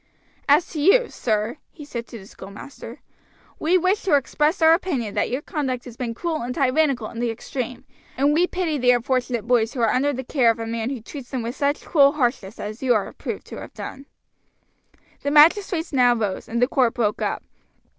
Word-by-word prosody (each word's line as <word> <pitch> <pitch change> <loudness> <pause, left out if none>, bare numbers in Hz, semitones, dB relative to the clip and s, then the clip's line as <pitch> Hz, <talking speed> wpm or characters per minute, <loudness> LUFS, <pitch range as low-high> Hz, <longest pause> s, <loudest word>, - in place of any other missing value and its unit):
"As 300 +4 +5
to 305 - -3
you, 460 +9 +5
sir," 215 +3 -1
he 300 - -12
said 235 -5 -6
to 235 - -9
the 195 - -12
schoolmaster, 200 +8 -11 0.6
"we 345 +4 +3
wish 370 +4 +1
to 360 -7 +3
express 300 +4 +1
our 320 0 +6
opinion 275 - -1
that - - 0
your 255 +4 -3
conduct 260 -5 -3
has 245 -3 -10
been 235 -2 -4
cruel 325 +3 -2
and 245 +1 -4
tyrannical 270 -4 +1
in 230 - -7
the 240 0 0
extreme, 245 +2 -5 0.3
and 285 +2 +3
we 345 +4 +3
pity 340 -6 -2
the 250 0 +2
unfortunate 245 -2 +1
boys 235 0 +2
who - - -4
are 225 - +3
under 280 +3 +2
the 260 -1 -4
care 250 -2 +2
of 225 - +2
a 225 - -4
man 225 +1 -3
who 265 -4 -5
treats 270 0 -9
them 255 -4 -3
with 235 +3 -4
such 285 +1 -1
cruel 280 -3 +5
harshness 240 -7 -1
as 215 +2 -6
you 255 -3 +3
are 210 - -2
proved - - -6
to - - -9
have - - -11
done." 275 +1 -8 1.1
The 285 - -1
magistrates 325 +3 +4
now 245 -2 +4
rose, 210 -5 -3
and 235 - -1
the 245 - +4
court 255 -4 +1
broke 215 -3 0
up. - - -2
255 Hz, 210 wpm, -23 LUFS, 235-295 Hz, 1.1 s, our